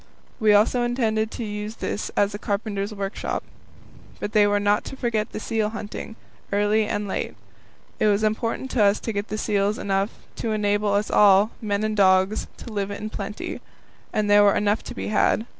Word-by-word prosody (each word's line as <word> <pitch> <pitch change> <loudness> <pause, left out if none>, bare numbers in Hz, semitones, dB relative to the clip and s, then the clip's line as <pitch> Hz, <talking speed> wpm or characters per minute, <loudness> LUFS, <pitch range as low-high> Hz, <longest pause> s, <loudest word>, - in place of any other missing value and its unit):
We 215 -2 +4
also 215 +4 +4
intended 225 -3 0
to 235 - -6
use 210 0 -5
this 210 - -3
as 205 0 +2
a 205 - -5
carpenter's 205 0 -2
workshop. 200 -1 -3 0.8
But 205 - -4
they 210 -1 +5
were 205 0 +2
not 205 0 +2
to - - -7
forget 225 -4 -1
the - - -5
seal 220 -1 -1
hunting, 220 0 -7 0.4
early 205 +1 +2
and 205 -1 -2
late. - - -3 0.6
It - - +3
was 205 +1 +2
important 230 +4 -1
to 225 - +3
us 200 +1 +4
to 225 - -4
get 200 +1 -3
seals 205 0 +1
enough 195 +1 0 0.3
to 225 - -2
enable 205 0 +1
us 205 +1 0
all, 205 +1 +6
men 205 -1 -1
and 215 0 -1
dogs, 190 +1 +3
to 230 - -9
live 200 -1 -2
in 210 +1 -5
plenty. 205 0 -5 0.5
And 215 -1 0
there 205 0 +6
were 200 -1 +5
enough 205 +1 +1
to - - -7
be - - -4
had. 215 +1 +2
210 Hz, 190 wpm, -24 LUFS, 205-215 Hz, 0.8 s, all